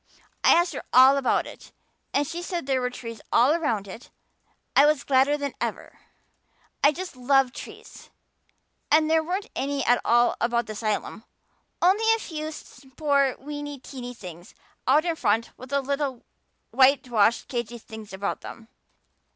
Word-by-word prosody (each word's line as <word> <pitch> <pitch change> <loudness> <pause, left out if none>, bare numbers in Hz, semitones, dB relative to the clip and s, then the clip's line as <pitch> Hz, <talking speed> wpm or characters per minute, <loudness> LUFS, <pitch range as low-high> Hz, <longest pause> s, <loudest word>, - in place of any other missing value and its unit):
I - - +7
asked 345 +1 +2
her - - -5
all 260 +2 +7
about 275 -2 +1
it. - - -12 0.4
And 285 +1 +1
she 335 +4 -5
said 350 -3 -4
there 265 -1 0
were 250 - -1
trees 230 -2 -9
all 250 +5 +5
around 235 -12 -1
it. 220 +5 -11 0.7
I 275 - +7
was 300 -2 +1
gladder 275 +2 +3
than 285 -2 -4
ever. - - -5 0.8
I 290 - +7
just 360 +1 -7
love 260 0 +2
trees. - - -11 0.8
And 310 +1 +4
there 320 0 +3
weren't 380 +7 -4
any 275 0 -2
at 245 0 +3
all 240 +1 +3
about 235 0 +1
the 215 - -6
asylum, 215 -1 -3 0.6
only 420 +5 +4
a - - -3
few 310 -7 -6 0.4
poor 280 -3 +2
weeny 290 +1 -7
teeny 250 -2 -9
things 175 -4 -11 0.3
out 295 +5 +4
in 335 -2 0
front 225 -5 0
with 255 +1 -12
little 280 -2 -2 0.5
whitewashed 245 -5 +3
cagey 240 -1 -4
things 220 -2 -11
about 195 +1 -4
them. 225 0 -11
270 Hz, 155 wpm, -25 LUFS, 235-300 Hz, 0.8 s, I